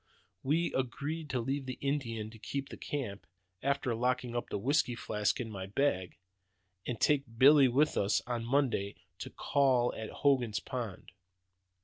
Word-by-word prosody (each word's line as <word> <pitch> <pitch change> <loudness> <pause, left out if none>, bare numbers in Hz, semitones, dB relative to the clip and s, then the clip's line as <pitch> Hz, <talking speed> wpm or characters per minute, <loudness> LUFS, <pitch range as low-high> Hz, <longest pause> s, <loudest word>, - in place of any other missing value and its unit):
We 160 +5 +1
agreed 145 +5 -3
to 130 - 0
leave 135 +3 -2
the 130 - -4
Indian 115 -6 -2
to 110 - -13
keep 140 +4 -4
the - - -7
camp 120 -9 -5 0.3
(after 140 -3 0
locking 125 +1 -1
up 120 - -2
the - - -2
whisky 130 +3 +1
flask 105 -2 -1
in 120 - -3
my 95 -2 -5
bag), 100 -6 0 0.7
and 120 -3 -3
take 145 -2 +3
Billy 140 +2 +8
with 140 +5 +2
us 100 +1 +2
on 120 -1 -2
Monday 120 -6 +1 0.2
to - - -5
'call' 130 -4 +2
at 110 - -5
Hogan's 125 -7 +1
Pond. 120 -10 -6
125 Hz, 155 wpm, -32 LUFS, 115-140 Hz, 0.7 s, Billy